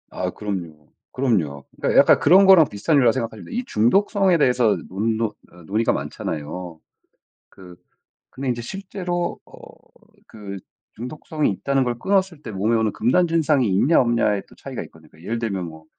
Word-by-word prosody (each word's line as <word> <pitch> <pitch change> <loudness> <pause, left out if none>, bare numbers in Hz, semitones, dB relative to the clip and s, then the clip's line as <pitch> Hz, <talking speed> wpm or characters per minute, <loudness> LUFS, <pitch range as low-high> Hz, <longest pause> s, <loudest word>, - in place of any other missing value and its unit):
아. 90 0 -3
그럼요. 85 -8 -7 0.2
그럼요. 85 - -1
그러니까 - - +1
약간 - - +6
그런 190 +6 +6
거랑 180 -6 +7
비슷한 145 +10 0
일이라고 120 -4 +5
생각하시면 115 -4 -5
돼요. - - -4
이 250 - -2
중독성에 190 - +2
대해서 125 -6 +3
논 110 +4 -1
노 110 -2 -1 0.2
어 90 -1 -16
논의가 110 +6 0
많잖아요. 80 +2 -5 0.7
그 90 -2 -14 0.6
근데 130 0 -4
이제 120 -1 -3
실제로 180 - -4
어 - - -20 0.7
그 100 -3 -8 0.4
중독성이 150 +5 -3
있다는 135 +6 0
걸 120 -1 -3
끊었을 190 -4 0
때 115 - -7
몸에 105 +3 0
오는 110 -2 0
금단 170 +10 +2
증상이 150 -7 +2
있냐 130 - +3
없냐에 115 -4 +1
또 - - -19
차이가 - - -6
있거든요. 80 -2 -18
예를 115 +4 -3
들면 100 -6 -3
뭐 80 -1 -11
115 Hz, 370 characters per minute, -22 LUFS, 100-155 Hz, 0.7 s, 거랑